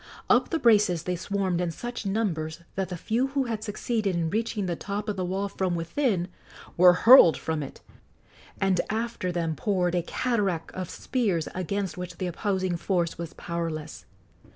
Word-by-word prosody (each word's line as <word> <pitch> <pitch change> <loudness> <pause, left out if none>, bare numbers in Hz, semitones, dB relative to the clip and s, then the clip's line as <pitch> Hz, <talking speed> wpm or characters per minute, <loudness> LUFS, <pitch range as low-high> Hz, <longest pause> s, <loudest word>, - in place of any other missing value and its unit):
Up - - +4
the 330 - 0
braces 210 - +4
they 180 +1 -1
swarmed 185 -1 -1
in 175 - 0
such 240 +5 -5
numbers 170 -7 -1
that 190 -1 -2
the 180 - -4
few 235 +9 0
who 275 0 0
had 225 -4 -3
succeeded 215 -2 -1
in 165 -1 -1
reaching 220 -2 -1
the 175 -2 -1
top 205 +4 -4
of 210 - -1
the 185 - -2
wall 190 +3 -1
from 190 -2 -1
within 175 - 0 0.5
were 180 0 +7
hurled 230 -9 +9
from 160 -1 -2
it, 140 - -8 0.8
and 190 -2 +2
after 225 -4 -2
them 165 -2 -1
poured 180 +2 0
a 175 - +2
cataract 195 -4 -1
of 185 -2 -5
spears 200 -11 -1
against 185 +1 -3
which 180 -1 -6
the 185 - -3
opposing 185 0 -1
force 170 -2 -1
was 170 -1 -5
powerless. 165 -3 -5
185 Hz, 175 wpm, -27 LUFS, 170-210 Hz, 0.8 s, hurled